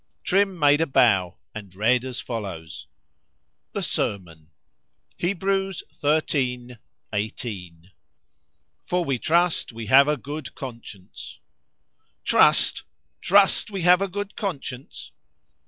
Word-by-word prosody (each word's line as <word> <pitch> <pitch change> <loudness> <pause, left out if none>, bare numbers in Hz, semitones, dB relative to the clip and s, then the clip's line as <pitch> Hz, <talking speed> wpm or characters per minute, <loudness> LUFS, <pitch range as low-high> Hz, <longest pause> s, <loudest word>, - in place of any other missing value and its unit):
Trim 195 0 +1
made 145 -1 +4
a 165 - +1
bow, 100 -9 +3 0.2
and 100 -4 -10
read 120 +5 +2
as 130 -2 -4
follows: 95 -10 -6 0.9
The - - -2
S - - 0
E - - +3
R - - +2
M 95 -3 -16
O - - -13
N. 80 -1 -20 0.7
HEBREWS 195 0 -1 0.4
xiii. 125 -3 -2 0.4
18. 95 -5 -5 0.9
———For 180 -1 -1
we 135 -4 -1
trust 170 +1 +1
we 115 -1 -7
have 135 +6 +6
a 150 0 +1
good 145 +2 -7
Conscience. 115 -7 -10 0.8
"TRUST!——Trust 200 +2 +2
we 195 -4 -4
have 180 +2 +5
a 195 - 0
good 205 +2 -6
conscience!" 135 - -6
130 Hz, 120 wpm, -24 LUFS, 105-175 Hz, 0.9 s, have